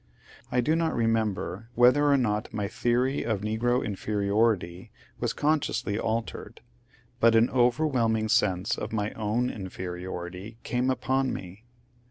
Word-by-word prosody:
I 125 Hz, 0 st, +2 dB
do 155 Hz, +6 st, +2 dB
not 165 Hz, -1 st, 0 dB
remember 115 Hz, -2 st, -1 dB
whether 145 Hz, +4 st, +5 dB
or 140 Hz, -, +5 dB
not 105 Hz, -4 st, -1 dB
my 105 Hz, -2 st, -2 dB
theory 125 Hz, +5 st, 0 dB
of 110 Hz, -4 st, -1 dB
negro 115 Hz, +4 st, 0 dB
inferiority 100 Hz, -3 st, 0 dB, 0.3 s
was -, -, 0 dB
consciously 130 Hz, -8 st, 0 dB
altered, 115 Hz, -1 st, -3 dB, 0.6 s
but 115 Hz, -1 st, +5 dB
an 115 Hz, +1 st, +4 dB
overwhelming 120 Hz, -3 st, +2 dB
sense 95 Hz, -4 st, +1 dB
of -, -, -5 dB
my 105 Hz, -1 st, -1 dB
own 110 Hz, +3 st, -1 dB
inferiority 90 Hz, +1 st, -6 dB
came 125 Hz, +1 st, 0 dB
upon 130 Hz, 0 st, 0 dB
me. 95 Hz, +5 st, -8 dB
115 Hz, 130 wpm, -27 LUFS, 105-125 Hz, 0.6 s, whether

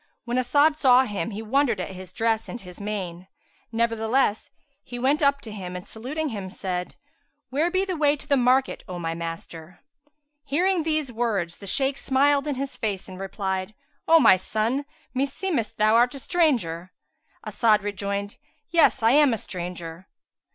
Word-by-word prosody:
When 240 Hz, +1 st, -1 dB
As'ad 290 Hz, +5 st, +3 dB
saw 260 Hz, -3 st, +6 dB
him, 205 Hz, -8 st, -3 dB
he 215 Hz, +1 st, -6 dB
wondered 240 Hz, -2 st, +1 dB
at 185 Hz, -, -4 dB
his 185 Hz, -1 st, -10 dB
dress 225 Hz, +2 st, 0 dB
and 240 Hz, -, -6 dB
his 180 Hz, -2 st, -12 dB
mien; 185 Hz, -4 st, -5 dB, 0.4 s
nevertheless, 230 Hz, 0 st, +1 dB, 0.3 s
he 245 Hz, -, -8 dB
went 270 Hz, +5 st, +1 dB
up 280 Hz, -1 st, +3 dB
to 220 Hz, -, -9 dB
him 185 Hz, -3 st, -6 dB
and 180 Hz, -, -7 dB
saluting 285 Hz, +8 st, -4 dB
him 200 Hz, -5 st, -5 dB
said, 180 Hz, -2 st, -4 dB, 0.6 s
"Where 305 Hz, +6 st, +1 dB
be 375 Hz, +2 st, +1 dB
the 375 Hz, -2 st, -2 dB
way 295 Hz, -2 st, +3 dB
to 295 Hz, -, -15 dB
the 285 Hz, -, +4 dB
market, 255 Hz, +1 st, +2 dB
O 180 Hz, -2 st, -5 dB
my 165 Hz, -1 st, -3 dB
master?" 165 Hz, 0 st, -7 dB, 0.6 s
Hearing 345 Hz, +6 st, +1 dB
these 310 Hz, -4 st, -1 dB
words 215 Hz, -8 st, -1 dB
the 200 Hz, -, -9 dB
Shaykh 270 Hz, +6 st, 0 dB
smiled 280 Hz, +2 st, +2 dB
in 290 Hz, -, -1 dB
his 275 Hz, +1 st, -4 dB
face 200 Hz, -4 st, -3 dB
and 185 Hz, -1 st, -9 dB
replied, 190 Hz, 0 st, -3 dB, 0.3 s
"O 330 Hz, 0 st, +7 dB
my 225 Hz, -9 st, +7 dB
son, 220 Hz, +8 st, -1 dB, 0.3 s
meseemeth 275 Hz, -, -1 dB
thou 215 Hz, +1 st, +4 dB
art 245 Hz, +4 st, +4 dB
a -, -, -7 dB
stranger?" 235 Hz, -, 0 dB, 0.5 s
As'ad 215 Hz, -3 st, +2 dB
rejoined, 200 Hz, 0 st, -3 dB, 0.3 s
"Yes, 335 Hz, -8 st, +4 dB
I 225 Hz, -, +5 dB
am 285 Hz, -3 st, +5 dB
a -, -, -5 dB
stranger." 175 Hz, -2 st, -7 dB
230 Hz, 170 wpm, -25 LUFS, 190-280 Hz, 0.6 s, O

